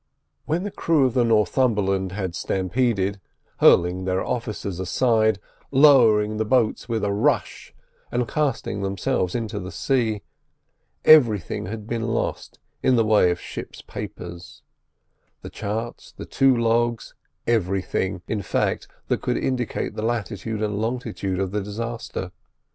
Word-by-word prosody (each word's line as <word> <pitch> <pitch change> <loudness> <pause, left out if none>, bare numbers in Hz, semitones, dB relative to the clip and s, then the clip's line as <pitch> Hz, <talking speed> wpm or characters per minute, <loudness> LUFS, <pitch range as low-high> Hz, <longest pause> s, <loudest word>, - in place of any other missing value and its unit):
When 165 +4 -1
the 205 - -4
crew 160 -7 +2
of 125 - 0
the 125 -2 +3
Northumberland 105 -4 +2
had 95 -3 -3
stampeded, 100 +1 0 0.4
hurling 90 +2 +4
their 95 0 0
officers 110 -6 -4
aside, 110 +2 +2 0.3
lowering 115 -7 +5
the 110 - +1
boats 115 +1 +1
with 115 -2 -1
a 100 - +1
rush, 100 - 0 0.4
and 120 -1 0
casting 135 -9 -1
themselves 95 0 -1
into 110 -3 -3
the 90 0 -7
sea, 115 -6 0 0.8
everything 115 - +5
had 105 +1 -6
been 115 +1 -3
lost 115 0 -3 0.2
in 130 - +3
the 115 -2 +3
way 105 -4 +4
of 90 0 -1
ship's - - -8
papers; 85 0 -8 0.8
the - - -8
charts, 110 +3 -5
the - - -9
two 135 -2 +3
logs—everything, 115 -5 -1
in 110 -2 -2
fact, - - -1 0.2
that - - 0
could - - -1
indicate 125 -3 -2
the - - -5
latitude 110 -1 -2
and 105 0 -1
longitude 110 -5 -3
of 95 -1 -1
the 105 0 -1
disaster. 110 -2 -5
110 Hz, 135 wpm, -23 LUFS, 95-120 Hz, 0.8 s, lowering